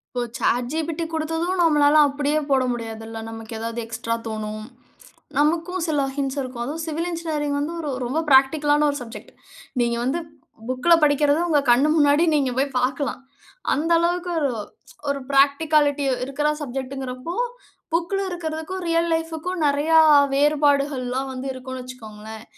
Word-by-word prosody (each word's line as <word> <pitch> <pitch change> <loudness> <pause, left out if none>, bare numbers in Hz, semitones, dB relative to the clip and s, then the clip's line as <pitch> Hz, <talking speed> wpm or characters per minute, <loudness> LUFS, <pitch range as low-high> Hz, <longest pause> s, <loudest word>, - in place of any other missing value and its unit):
இப்போ 245 - 0
chat 245 0 0
GPT 320 +2 -2
குடுத்ததும் 325 +3 -2
நம்மளால 300 -3 +4
அப்படியே 290 +2 0
போட 270 -2 +3
முடியாதுல்ல. 225 -1 -5
நமக்கு 225 0 -9
ஏதாவது 230 +1 -5
எக்ஸ்ட்ரா 230 0 -3
தோணும். 215 0 -5 0.7
நமக்கும் 335 +5 +1
சில 300 -3 +1 0.2
ஹிண்ட்ஸ் 275 0 -2
இருக்கும். 255 -2 -5
அதுவும் 315 +5 -4
சிவில் 325 +2 -3
என்ஜினியரிங் 310 -4 -2
வந்து 300 +4 -2
ஒரு 310 -3 -4
ரொம்ப 255 +6 -1
பிராக்டிகலான 290 +2 +4
1 285 - -2
சப்ஜெக்ட். 235 -1 -10 0.5
நீங்க 235 0 +1
வந்து 265 +7 0 0.5
புக்குல 255 +7 +3
படிக்கறது, 290 +1 +3
உங்க 300 -4 +3
கண்ணு 265 +5 +4
முன்னாடி 290 +1 +4
நீங்க 275 -3 +1
போய் 280 +1 +1
பாக்கலாம். 265 +2 -1 0.5
அந்த 315 +4 -1
அளவுக்கு 350 +1 0 0.8
ஒரு 280 0 -1
பிராக்டிகாலிட்டி 285 +1 +3 0.2
இருக்கிற 275 +3 -1
சப்ஜெக்ட்ங்கிறப்போ, 265 +2 -5 0.6
புக்குல 345 +4 0
இருக்கறதுக்கும், 340 +1 -4
ரியல் 335 0 +1
லைஃப்க்கும் 325 +2 -4
நெறையா 295 +3 +3 0.4
வேறுபாடுகள்லாம் 280 -3 +1
வந்து 260 +1 -5
இருக்கும்ன்னு 260 0 -7
வச்சுக்கோங்களேன். 220 -3 -10
285 Hz, 135 wpm, -23 LUFS, 255-320 Hz, 0.8 s, நம்மளால